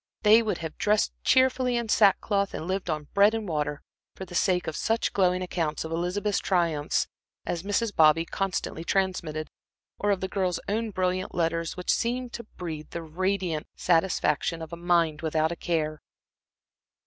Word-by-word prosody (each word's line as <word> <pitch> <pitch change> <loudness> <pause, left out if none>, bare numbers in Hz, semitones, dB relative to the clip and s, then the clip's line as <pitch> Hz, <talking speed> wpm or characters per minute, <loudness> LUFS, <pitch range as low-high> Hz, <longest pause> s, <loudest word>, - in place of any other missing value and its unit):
They 220 +2 +7
would 220 -2 -1
have 160 - -7
dressed 210 0 +2
cheerfully 260 -1 +3
in 235 -1 -2
sackcloth 200 -1 +3
and 160 - -5
lived 190 -1 -2
on 150 -2 -3
bread 205 +2 +5
and 220 -2 -3
water, 150 -3 -2 0.3
for 190 - -7
the 175 - -12
sake 180 0 +2
of 160 - -4
such 225 +6 0
glowing 185 -1 +2
accounts 165 -4 -2
of 160 - -6
Elizabeth's 180 +5 0
triumphs 170 -6 +1 0.4
as 170 - -2
Mrs. 205 +2 -1
Bobby 160 +1 +5
constantly 180 -3 -3
transmitted, 170 -5 -1 0.5
or 205 - 0
of 200 -2 +2
the 190 - -2
girl's 185 -3 -1
own 220 +2 -1
brilliant 185 -1 -1
letters 165 0 -1
which 180 - +1
seemed 245 +1 -2
to 235 - -6
breathe 160 -4 -6
the 170 - -5
radiant 180 0 -2
satisfaction 165 -2 +1
of 160 +1 -9
a - - -2
mind 170 -3 +1
without 160 0 +1
a - - -3
care. 155 -3 -2
180 Hz, 170 wpm, -27 LUFS, 165-200 Hz, 0.5 s, They